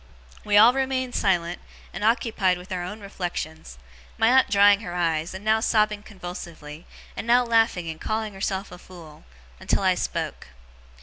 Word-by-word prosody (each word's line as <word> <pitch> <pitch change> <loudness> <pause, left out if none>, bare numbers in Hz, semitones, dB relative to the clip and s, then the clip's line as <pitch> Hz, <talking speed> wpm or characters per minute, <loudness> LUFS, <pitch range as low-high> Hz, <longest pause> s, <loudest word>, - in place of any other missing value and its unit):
We 205 -1 +2
all 225 +4 +8
remained 260 -1 -1
silent, 175 -3 0 0.3
and - - -6
occupied 215 -5 +1
with 180 +1 -13
our 180 -1 -3
own 210 +5 -7
reflections 175 - -6 0.4
(my 225 - +3
aunt 260 +1 +4
drying 205 0 +5
her 180 -5 -7
eyes, 165 0 -1
and 190 +3 -9
now 220 0 +3
sobbing 215 -2 +1
convulsively, 175 -6 -9 0.3
and - - -6
now 245 +1 +5
laughing 225 -7 +1
and 160 -1 -7
calling 215 -1 -3
herself 195 0 -3
a 180 - -11
fool); 170 - -14 0.3
until - - 0
I - - +4
spoke. - - -4
200 Hz, 165 wpm, -24 LUFS, 175-220 Hz, 0.4 s, all